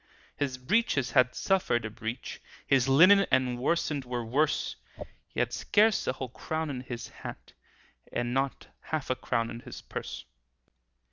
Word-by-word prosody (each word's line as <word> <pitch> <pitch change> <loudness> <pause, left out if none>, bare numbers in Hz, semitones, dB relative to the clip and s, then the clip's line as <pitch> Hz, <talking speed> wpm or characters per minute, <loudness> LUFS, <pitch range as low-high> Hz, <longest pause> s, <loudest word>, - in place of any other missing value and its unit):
His 135 -3 -2
breeches 135 - +1
had 125 -2 +4
suffered 180 - +1
a 110 - -4
breach, 115 +3 -6 0.2
His 135 -1 +3
linen 185 +8 +7
and 125 -2 +2
worsted 145 0 0
were 125 -2 -3
worse; 145 +7 +1 0.5
He - - -6
had - - +1
scarce 215 0 +3
a - - +2
whole 130 -1 -5
crown 160 +5 -3
in 125 -2 -4
his 120 -2 -6
hat, - - -10 0.6
And 120 0 -1
not 135 +1 -1
half 155 -4 -3
a - - +2
crown 115 -2 -1
in 115 - -6
his 125 0 -9
purse. - - -6
130 Hz, 155 wpm, -29 LUFS, 120-155 Hz, 0.6 s, linen